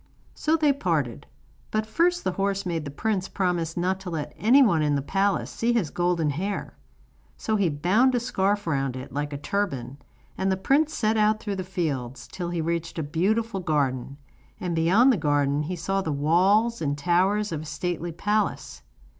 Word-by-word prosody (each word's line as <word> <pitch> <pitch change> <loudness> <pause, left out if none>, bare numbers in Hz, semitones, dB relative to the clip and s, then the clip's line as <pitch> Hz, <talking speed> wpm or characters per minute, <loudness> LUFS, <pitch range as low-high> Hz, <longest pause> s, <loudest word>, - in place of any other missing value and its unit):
So 315 +2 +1
they 300 -3 +3
parted; 160 - -2 0.4
but 215 0 -1
first 345 +11 +1
the 185 - 0
horse 195 +1 -1
made 165 -4 -2
the - - -4
prince 190 +5 -1
promise 175 -4 -1
not 185 +2 0
to 190 -1 -7
let 155 -4 -4
anyone 225 - +4
in 150 -1 +2
the 140 - 0
palace 195 +5 0
see 235 +1 0
his 205 -11 0
golden 175 -4 +1
hair. 195 +8 -4 0.6
So 220 - -1
he 200 -5 +2
bound 190 - +2
a - - +2
scarf 205 -3 0
round 135 -5 -1
it, 130 +1 -7
like 145 +1 -2
a 145 - -4
turban, 140 -7 -3 0.4
and 190 0 +1
the 190 - +1
prince 290 +10 +2
set 220 0 +1
out 215 0 +3
through 205 -3 -4
the 185 - -3
fields, 135 -9 -3
till 175 -2 -5
he 175 -1 -2
reached 170 +1 -3
a 160 - -1
beautiful 195 +8 0
garden, 140 -5 -1 0.4
and 175 -2 -2
beyond 195 +11 +5
the - - 0
garden 145 -2 +1
he 170 +5 -3
saw 195 +4 -1
the 160 - -2
walls 190 +11 +2
and 145 -2 -1
towers 190 +6 +1
of 155 -2 -3
a - - -8
stately 170 +3 -3
palace. 205 +5 -1
180 Hz, 190 wpm, -25 LUFS, 150-210 Hz, 0.6 s, beyond